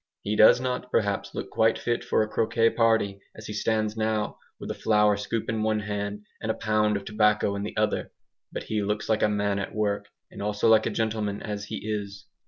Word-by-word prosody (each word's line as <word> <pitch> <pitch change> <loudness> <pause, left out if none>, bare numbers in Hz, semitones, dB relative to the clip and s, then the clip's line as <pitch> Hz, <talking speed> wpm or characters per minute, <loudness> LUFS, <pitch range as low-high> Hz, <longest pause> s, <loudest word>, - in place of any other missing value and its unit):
He 105 +1 -1
does 110 +3 +7
not 125 0 -3
perhaps 100 -3 0
look - - -5
quite 110 0 +3
fit 120 0 -1
for - - +2
a - - -3
croquet 115 +1 +2
party 110 -4 +2 0.2
as 110 - -10
he 105 - -5
stands 110 0 0
now, 110 -1 -1 0.2
with - - -5
a - - -2
flour 105 -1 +3
scoop 105 +2 -3
in 110 0 -1
one 110 0 +1
hand 105 0 -4 0.2
and 110 - -3
a 110 - +1
pound 105 -1 +1
of 100 - -8
tobacco 105 -1 +2
in 100 - -3
the 105 - -5
other. 105 0 0 0.4
But - - -5
he 110 -1 -2
looks 105 +1 -2
like 110 -1 +2
a 105 - +4
man 100 -1 0
at 100 - -5
work, 105 -1 -1 0.2
and - - -9
also 105 +1 0
like 110 -1 +5
a - - +1
gentleman, 110 -2 -1
as 105 -1 -4
he 105 - -6
is. 100 -2 -4
105 Hz, 220 wpm, -26 LUFS, 105-110 Hz, 0.4 s, does